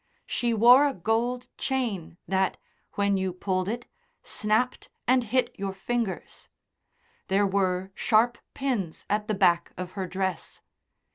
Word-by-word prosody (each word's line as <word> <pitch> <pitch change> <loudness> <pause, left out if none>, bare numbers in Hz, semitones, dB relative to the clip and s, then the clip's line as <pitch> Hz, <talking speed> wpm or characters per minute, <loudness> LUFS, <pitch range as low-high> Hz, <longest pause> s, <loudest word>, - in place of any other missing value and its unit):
She 240 -1 0
wore 245 +6 +7
a 275 - -2
gold 235 +6 0
chain 225 - -2
that 190 0 +1 0.4
when 200 -1 +1
you 190 -1 -1
pulled 185 +1 -1
it 240 +2 -3 0.4
snapped 215 +4 0 0.2
and 255 0 +4
hit 255 +3 +1
your 195 -1 -3
fingers. 230 0 -3 0.8
There 200 +1 +3
were 190 -1 0
sharp 235 +3 +2 0.2
pins 240 - -2
at 210 0 0
the 215 - 0
back 175 -3 +3
of 180 0 -5
her 190 -2 -4
dress. 190 -1 -3
205 Hz, 135 wpm, -27 LUFS, 190-240 Hz, 0.8 s, wore